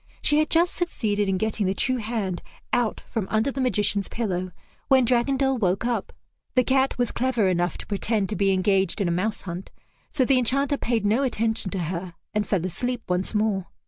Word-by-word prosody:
She 295 0 +6
had 310 - +1
just 340 +2 +3
succeeded 210 - -1
in 190 - +1
getting 215 0 -1
the 190 - 0
true 255 +6 +1
hand 215 -6 -2 0.3
out 240 -3 +1
from 220 -5 -4
under 220 +5 +1
the 270 - -3
magician's 205 -4 +1
pillow 185 -5 -2 0.4
when 260 -2 +5
Dragondel 265 +2 +2
woke 190 +1 +1
up. 240 -1 -1 0.4
The 255 - +5
cat 265 +1 +2
was 245 -1 +1
clever 240 -5 +1
enough 175 -1 0
to - - -8
pretend 205 0 0
to 215 - -2
be 195 +1 +2
engaged 190 0 +1
in 195 - +1
a - - +1
mouse 200 +5 -1
hunt, 180 0 -6 0.4
so 265 -4 +2
the 260 0 +4
Enchanter 275 +4 +1
paid 230 -5 -1
no 220 +6 +3
attention 225 -6 0
to 190 - -3
her 175 0 -6 0.2
and 210 -1 0
fell 185 -4 0
asleep 245 +7 -2
once 180 +4 -1
more. 210 -3 +1
220 Hz, 200 wpm, -25 LUFS, 190-255 Hz, 0.4 s, She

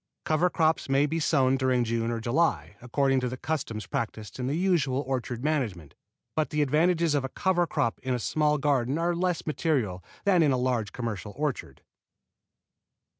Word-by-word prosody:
Cover 160 +3 +2
crops 160 -4 +1
may 135 +1 +4
be 160 +3 -1
sown 135 -4 +3
during 130 -2 +2
June 115 0 -1
or 115 -1 -2
July, 115 - 0
according 135 +2 +1
to 125 -1 -2
the 130 - -5
custom 130 -7 -3
practised 110 -1 -4
in 125 - -2
the 140 - 0
usual 155 -8 +1
orchard 125 -2 -3
management; 115 - -2 0.4
but 155 -1 0
the 150 -1 +1
advantages 165 +3 +2
of 145 -2 +1
a 135 - -3
cover 175 +3 +1
crop 115 - -1
in 130 -1 -1
a - - -2
small 150 +4 +1
garden 140 -1 +1
are 170 +1 +1
less 180 -1 -1
material 130 - -1 0.2
than 190 -4 +4
in 150 -3 +4
a 130 - +2
large 125 -4 0
commercial 105 -4 -5
orchard. 145 -3 -3
135 Hz, 175 wpm, -27 LUFS, 120-155 Hz, 0.4 s, may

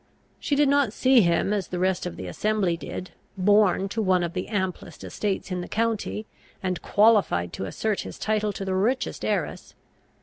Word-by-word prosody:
She 285 - 0
did 290 0 +4
not 280 -5 +2
see 260 0 +5
him, 170 +2 +2
as 200 -3 -1
the 180 - -4
rest 185 0 0
of - - -6
the - - -7
assembly 210 -5 0
did, 180 +2 -7 0.3
born 200 0 +3
to 220 +3 -2
one 185 -3 +2
of 170 -1 -3
the 185 -1 -3
amplest 190 -4 -4
estates 200 -1 -3
in 180 -1 -2
the 175 - -6
county, 220 -1 -1 0.4
and 185 -3 -2
qualified 200 - +3
to - - -4
assert 210 - -2
his - - -6
title 215 -1 0
to 195 - -5
the 190 - -1
richest 225 +8 0
heiress. - - -2
200 Hz, 190 wpm, -25 LUFS, 185-215 Hz, 0.4 s, see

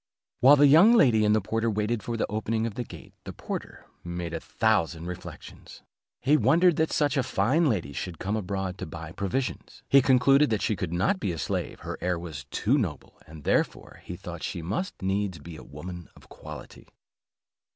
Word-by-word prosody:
While 135 +4 +8
the 145 0 +5
young 165 +11 +7
lady 120 - +5
and 105 0 +4
the 110 - +2
porter 115 +4 -1
waited 105 +1 -1
for 115 +1 -4
the - - 0
opening 110 +1 -1
of 115 - -3
the 125 - -4
gate, - - -12
the - - -7
porter - - -7 0.2
made 85 -1 -5
a 80 - -2
thousand 85 -8 0
reflections. 90 0 -10 0.4
He 145 +5 +3
wondered 170 +1 +4
that 160 0 +1
such 145 -1 +1
a - - +4
fine 130 +8 +1
lady 85 - -2
should 85 +3 -5
come 100 +6 -2
abroad 95 -2 -3
to - - -5
buy 80 0 -8
provisions; 100 +8 -4
he 140 - +6
concluded 130 -2 +4
she 105 - 0
could 85 - -4
not 100 - +1
be 95 - -1
a 85 - -5
slave, - - -3
her - - -6
air 90 -1 0
was 80 -6 -7
too 120 - +1
noble, 85 - -5
and 80 -2 -12
therefore - - -1
he - - -7
thought - - -8
she 85 - -4
must 110 - -3
needs 95 -1 -1
be 80 +2 -10
a - - -10
woman 85 +3 -9
of - - -19
quality. - - -11
105 Hz, 195 wpm, -27 LUFS, 85-130 Hz, 0.4 s, While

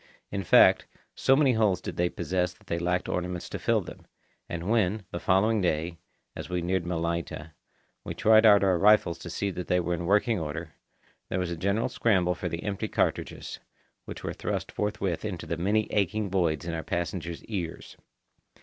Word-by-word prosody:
In 100 -1 -2
fact, - - +6 0.3
so 135 - +3
many 135 -3 +4
holes 105 -5 +2
did - - -6
they 90 0 +1
possess 90 0 -1
that - - -25
they 85 - -2
lacked 90 +1 0
ornaments 90 0 -3
to - - -5
fill - - +2
them; - - -11 0.4
and 85 +1 -4
when, 105 -2 +1
the 85 - -4
following 105 +5 +2
day, 85 -1 -1 0.4
as - - -7
we 90 -1 -2
neared 90 0 0
Malaita, 85 -2 -3 0.5
we - - -5
tried 110 0 +5
out 105 -2 +7
our 95 -3 +3
rifles 100 -4 +4
to 85 - -8
see 100 +4 -2
that 90 -1 -6
they 90 - +2
were 90 0 -1
in 85 0 -3
working 105 +2 +3
order, 80 +1 -5 0.6
there - - -1
was 90 -2 -2
a - - -2
general 100 +7 0
scramble 95 -6 +2
for 90 0 -4
the 85 +1 -5
empty 100 -1 -2
cartridges, - - -2 0.5
which - - -8
were - - -3
thrust - - -3
forthwith 105 -4 -2
into 100 -5 -4
the 85 - -2
many 105 +5 +1
aching 105 0 0
voids 85 -5 0
in 85 - -3
our 80 - -2
passengers' 85 -1 -4
ears. 90 -7 -5
90 Hz, 190 wpm, -27 LUFS, 85-105 Hz, 0.6 s, out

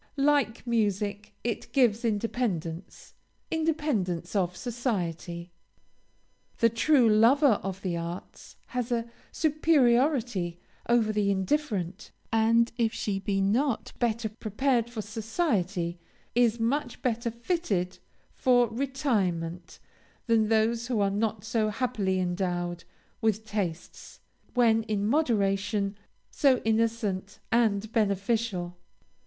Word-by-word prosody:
Like 275 -5 +2
music, 210 -3 -1
it 235 -2 -3
gives 240 -5 +3
independence 205 -6 -3 0.4
independence 300 - -1
of 180 -2 0
society. 180 -8 -3 1.1
The 230 - +4
true 245 +2 +4
lover 230 +3 +5
of 195 0 -5
the 175 -3 -1
arts 170 +2 -7
has 250 -1 -3
a 235 -1 0 0.2
superiority 250 - +2 0.3
over 230 -3 +3
the 205 -1 +1
indifferent, 195 - -1 0.2
and, 230 +1 +4
if 225 -1 +2
she 205 -3 -2
be 195 0 -1
not 230 +6 0
better 230 -1 0
prepared 235 +3 0
for 225 -3 -5
society, 205 - -1 0.3
is 235 -1 +3
much 245 +2 -1
better 235 -1 0
fitted 230 - -2 0.3
for 245 -2 +3
retirement 205 - -2 0.5
than 225 -2 +3
those 225 +2 +2
who 245 -4 0
are 200 -1 +2
not 210 0 -1
so 220 -1 +1
happily 210 -5 -1
endowed 175 -1 -2 0.4
with 220 -1 +1
tastes, 185 -6 -5 0.4
when 230 -2 +4
in 205 -2 -1
moderation, 205 -6 +1 0.4
so 270 -3 +4
innocent 220 -4 0
and 220 -2 +2
beneficial. 200 -4 0
220 Hz, 105 wpm, -28 LUFS, 195-240 Hz, 1.1 s, lover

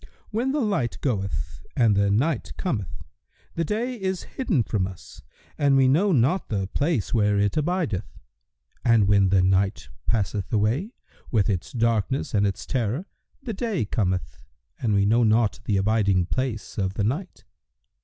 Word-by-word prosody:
When 235 +5 0
the 295 +1 0
light 200 - 0
goeth 95 - -3
and 115 -4 +4
the 100 0 +3
night 130 +10 0
cometh, 115 - -3 0.5
the 165 - -1
day 225 +9 -2
is 190 -2 -2
hidden 200 - 0
from 100 -4 -1
us 95 -2 -12 0.4
and 140 -2 +4
we 135 -1 +5
know 175 +10 +3
not 150 +6 +2
the 100 -3 -1
place 140 - -1
where 105 -3 +3
it 100 0 +1
abideth; 155 - -1 0.7
and 115 -4 +4
when 100 -1 +4
the 95 -1 +4
night 95 - +1 0.2
passeth 100 -3 -1
away 120 - 0 0.3
with 105 -3 +2
its 90 -3 -3
darkness 115 +2 0
and 100 -1 +3
its 100 - -4
terror, 125 - -1 0.4
the 235 -5 -4
day 210 - -1
cometh 95 -3 -2 0.4
and 110 -5 +1
we 100 0 +3
know 115 +4 +3
not 110 -1 +2
the 100 - +1
abiding 100 -3 +2
place 115 -1 -3
of 95 -1 -1
the 100 - 0
night. 150 - -3
110 Hz, 160 wpm, -25 LUFS, 100-150 Hz, 0.7 s, we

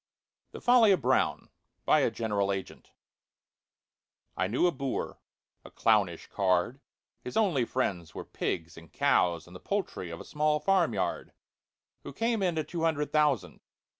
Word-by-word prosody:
THE - - -9
FOLLY 240 -4 +6
OF 185 - 0
BROWN 130 +1 +1 0.4
BY - - +5
A - - +2
GENERAL 100 -3 -1
AGENT 95 -1 -6 1.5
I 95 - 0
KNEW 120 - +1
a 175 - +4
boor—a 135 -3 -7
clownish - - +1
card 95 +7 0 0.4
(His 125 - -5
only 175 - +2
friends 90 -10 -2
were - - -6
pigs 80 -2 -4
and 80 -1 -13
cows 85 -3 +2
and 90 - -14
The - - -8
poultry 195 - -3
of 85 - -7
a - - -9
small 150 0 +1
farmyard), 190 -1 0 0.7
Who - - -9
came 230 -1 0
into 170 -4 0
two 170 +2 -5
hundred 155 -3 0
thousand. 145 -12 +1
130 Hz, 145 wpm, -29 LUFS, -, 1.5 s, FOLLY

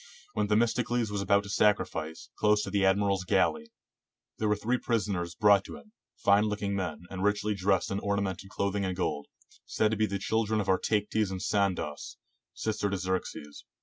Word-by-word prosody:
When 105 -1 0
Themistocles 115 +1 +1
was 100 -1 -2
about 100 +1 +3
to 100 - -9
sacrifice, 80 -7 0
close 105 0 +3
to 95 - -5
the 100 -1 +1
admiral's 100 -1 +2
galley, 165 - +1 0.7
there 110 - +1
were 105 - +3
three 120 +4 -1
prisoners 100 -7 -1
brought 100 -2 +5
to - - -8
him, 215 - -17 0.3
fine 100 +1 +4
looking 105 -1 -2
men, 90 -4 -3
and 95 -1 -4
richly 105 +1 +1
dressed 95 -1 +1
in 100 - -1
orna 100 0 0
mented 95 0 -5
clothing 100 0 -1
and 95 -1 -2
gold, 75 -5 -2 0.4
said 110 0 +1
to 110 - -1
be 110 0 +2
the 100 - -2
children 110 +2 0
of 100 - -1
Artayctes 105 +2 +1
and 95 -1 -4
Sandauce, 95 -8 -1 0.4
sister 105 -2 -1
to 100 - -1
Xerxes. 95 -6 -4
100 Hz, 180 wpm, -29 LUFS, 95-105 Hz, 0.7 s, brought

